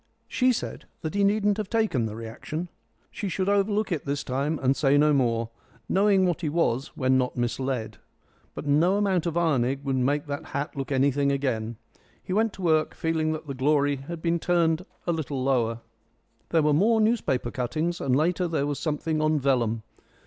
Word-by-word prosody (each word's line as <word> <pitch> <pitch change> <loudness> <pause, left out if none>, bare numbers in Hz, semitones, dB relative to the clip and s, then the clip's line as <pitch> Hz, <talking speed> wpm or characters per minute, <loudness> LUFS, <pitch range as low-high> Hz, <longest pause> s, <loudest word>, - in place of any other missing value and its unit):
She 255 0 +2
said 240 - -4 0.2
that 155 - -4
he 200 0 +1
needn't 205 0 +2
have 210 -2 -3
taken 215 - +1
the 105 - -7
reaction. 115 +9 -6 0.4
She 205 - -4
should 185 +3 -1
overlook 205 +1 +1
it 160 -5 -1
this 140 0 -2
time 140 +5 -1
and 135 0 +1
say 140 -1 +3
no 150 +1 +4
more, 115 -4 +1 0.4
knowing 195 -1 +3
what 175 -1 0
he 155 - -1
was 145 -4 0
when 130 -1 +3
not 125 -1 -2
misled. 120 -2 -2 0.6
But - - -6
no 160 +7 +3
amount 190 -4 +1
of 170 0 -2
ironing 135 -5 +1
would 135 -1 -1
make 140 +4 +1
that 145 -1 -4
hat 145 +2 -3
look 135 -1 -4
anything 140 +1 +2
again. 120 -5 -1 0.5
He 185 - -4
went 220 +2 +2
to 190 - -9
work 155 -2 +2
feeling 160 -1 0
that 155 - -6
the 140 - -5
glory 145 +1 +2
had 160 +5 -8
been 170 0 +1
turned 170 0 +1 0.2
a 175 - +1
little 145 -5 -3
lower. 120 -4 +1 0.7
There 165 -2 +3
were 150 0 +3
more 220 +9 +3
newspaper 215 - +1
cuttings, 155 +8 -2
and 130 - +1
later 175 +5 +1
there 160 -4 0
was 145 -1 -2
something 155 0 -1
on 155 0 +2
vellum. 120 -5 +1
150 Hz, 190 wpm, -26 LUFS, 135-175 Hz, 0.7 s, no